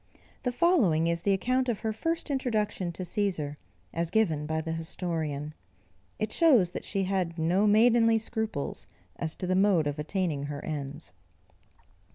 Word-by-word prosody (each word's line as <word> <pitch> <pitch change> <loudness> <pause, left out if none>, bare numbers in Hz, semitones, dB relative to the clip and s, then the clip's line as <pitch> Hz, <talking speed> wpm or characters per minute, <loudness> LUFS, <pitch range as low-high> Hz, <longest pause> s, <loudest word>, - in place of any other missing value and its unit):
The 250 - -1
following 240 - +3
is 170 0 0
the 200 - +1
account 255 +6 +1
of 225 - -2
her 220 -1 -1
first 330 +6 -2
introduction 215 -9 -1
to 185 - -5
Cæsar, 175 -6 -2 0.4
as 165 0 -1
given 160 -9 +1
by 160 0 -1
the 160 +1 -4
historian. 160 -3 -3 0.6
It 215 0 -2
shows 245 - +4
that - - -6
she 195 -1 -1
had 185 -3 -1
no 175 +6 +2
maidenly 225 +1 +5
scruples 220 -8 -3 0.3
as 160 -1 -3
to 185 - -3
the 185 - +1
mode 190 -4 +3
of 145 0 -2
attaining 155 -3 -1
her 145 0 -6
ends. 145 0 -5
185 Hz, 160 wpm, -28 LUFS, 160-220 Hz, 0.6 s, maidenly